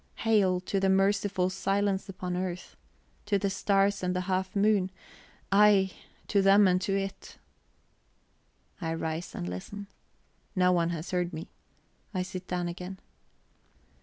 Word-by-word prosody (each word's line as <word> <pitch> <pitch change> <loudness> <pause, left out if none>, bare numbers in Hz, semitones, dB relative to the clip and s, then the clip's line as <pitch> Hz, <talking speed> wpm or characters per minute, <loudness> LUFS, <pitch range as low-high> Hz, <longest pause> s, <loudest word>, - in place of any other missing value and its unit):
Hail 200 -5 +3
to 195 +1 -1
the 190 0 +2
merciful 195 -1 +2
silence 195 0 0
upon 180 -1 -4
earth, 180 -1 -4 0.5
to 205 -1 +3
the 195 0 -1
stars 200 +1 +2
and 180 0 -1
the 180 - 0
half 185 +1 -2
moon; 200 -2 +3 0.6
ay, 200 -1 +5 0.4
to 200 - +3
them 195 +1 +6
and 180 0 +2
to 195 0 0
it!"... 195 0 -5 1.4
I 165 -1 -1
rise 160 +1 -4
and 85 - -4
listen. 90 - -6 0.7
No 180 -1 +4
one 170 -2 +2
has 165 -1 -4
heard 180 -1 -1
me. 160 +1 -7 0.6
I 185 - +1
sit 185 0 -7
down 180 -1 -2
again. 180 +2 -6
190 Hz, 140 wpm, -29 LUFS, 180-200 Hz, 1.4 s, them